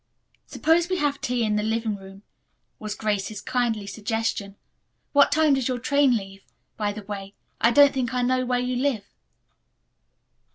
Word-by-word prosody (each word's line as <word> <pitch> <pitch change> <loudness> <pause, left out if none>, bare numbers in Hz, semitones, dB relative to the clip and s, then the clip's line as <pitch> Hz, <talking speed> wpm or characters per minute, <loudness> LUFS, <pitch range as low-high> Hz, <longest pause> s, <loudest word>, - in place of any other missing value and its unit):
"Suppose 330 +2 +2
we 370 - 0
have 290 -3 -1
tea 245 -1 0
in 210 -1 +1
the - - +1
living 220 0 -1
room," 195 0 -13 0.6
was 215 -1 -5
Grace's 210 -1 -2
kindly 235 -2 -1
suggestion. 220 -1 -3 0.6
"What 285 -1 +5
time 310 -1 +4
does 265 -3 0
your 255 -1 -1
train 280 -1 +3
leave? 195 -1 -9 0.3
By 210 -1 -1
the 210 0 -8
way, 200 -1 -7 0.2
I 230 - +4
don't 285 +4 +6
think 260 -2 -1
I 250 -1 0
know 255 +1 +1
where 250 0 0
you 250 0 -1
live." 255 -5 0
235 Hz, 165 wpm, -24 LUFS, 210-260 Hz, 0.6 s, don't